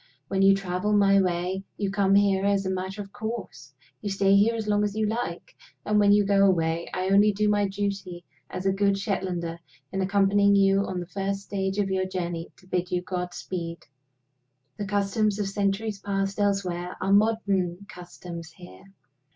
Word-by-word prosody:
When 195 0 0
you 195 0 +6
travel 195 +2 -2
my 200 -1 +5
way, 180 +1 -1
you 200 -2 -1
come 195 -1 +2
here 200 -1 +3
as 200 -1 +1
a 190 - -1
matter 190 +2 -4
of 195 0 -17
course; 220 - -6 0.3
you 205 - -3
stay 195 0 +3
here 215 +4 +4
as 220 -2 -4
long 205 0 +2
as 205 0 -2
you 220 0 +1
like; 215 -6 -4 0.3
and, 210 0 +2
when 205 -1 +5
you 205 0 +4
go 200 0 +3
away, 170 -3 +2
I 185 +1 -2
only 205 +2 +5
do 210 +1 0
my 205 -1 +2
duty 195 -3 -4 0.2
as 185 - -6
a 195 - +3
good 200 0 +2
Shetlander 185 -5 -3 0.3
in 190 0 -2
accompanying 200 +1 +3
you 195 0 +3
on 185 -1 -3
the - - -6
first 195 +2 -3
stage 195 -1 -3
of 200 -2 0
your 190 0 0
journey 175 -2 -4
to - - -21
bid 180 -1 -2
you 180 0 -1
godspeed. 175 -1 -5 0.9
The 205 -2 -4
customs 205 +1 0
of 205 -2 -1
centuries 200 +1 -1
past 195 0 -2
elsewhere 185 -3 -1
are 195 - +1
modern 200 -4 +1
customs 175 -3 -9
here. 180 +1 -14
195 Hz, 185 wpm, -26 LUFS, 185-205 Hz, 0.9 s, you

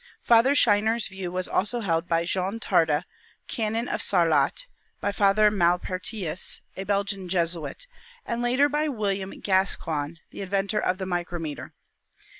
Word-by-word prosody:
Father 235 +4 +5
Scheiner's 220 -1 +3
view 190 -2 -6
was 185 0 -3
also 235 +5 0
held 165 -4 0
by 165 0 +1
Jean 190 +5 -2
Tarde, 165 -6 +2 0.4
Canon 225 +1 -2
of - - -1
Sarlat; 165 - +2 0.3
by 205 - -1
Father 205 +1 +4
Malpertius, 185 0 0
a 190 - -5
Belgian 200 -2 -1
Jesuit, 175 - -2 0.4
and 235 0 -2
later 255 +4 +3
by 300 +1 0
William 200 -7 -2
Gas 190 0 +2
coigne, 155 0 -4
the - - -8
inventor 195 +2 -1
of 185 - 0
the 190 - -4
micrometer. 175 -4 -4
195 Hz, 140 wpm, -26 LUFS, 175-215 Hz, 0.4 s, Father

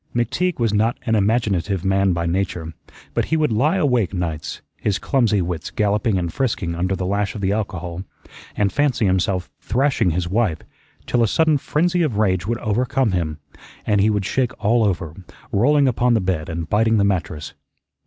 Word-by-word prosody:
McTeague 135 +10 0
was 115 -3 +1
not 110 +4 +1
an 115 - +1
imaginative 100 -4 +1
man 95 0 +2
by 85 -1 -1
nature, 85 -2 -2 0.4
but - - 0
he 160 - 0
would 155 -5 +1
lie 140 - +2
awake 125 - +1
nights, 80 -3 -4 0.2
his 100 -2 0
clumsy 115 -8 +1
wits 85 -3 -4
galloping 105 0 +1
and 85 -2 -2
frisking 110 -10 -1
under 90 +3 -1
the 95 0 -3
lash 100 +1 -1
of 105 - -5
the 95 0 +1
alcohol, 90 -5 -3 0.5
and 100 -2 +1
fancy 140 -6 +1
himself 95 -1 0
thrashing 125 -4 +1
his 85 +1 -1
wife, 100 -3 +1 0.5
till 120 - +1
a 115 - +4
sudden 155 +5 +2
frenzy 175 +6 +1
of 140 -11 0
rage 95 -4 +1
would 115 +1 0
overcome 120 +2 0
him, 80 -4 -2 0.5
and 105 -2 +2
he 105 - +4
would 105 -3 0
shake 125 +3 0
all 115 +3 +2
over, 90 -6 -1 0.4
rolling 140 +7 +3
upon 120 -1 +2
the - - +3
bed 90 -5 -2
and 85 0 -4
biting 110 +3 +2
the 100 - +3
mattress. 90 -6 -2
105 Hz, 185 wpm, -21 LUFS, 90-120 Hz, 0.5 s, a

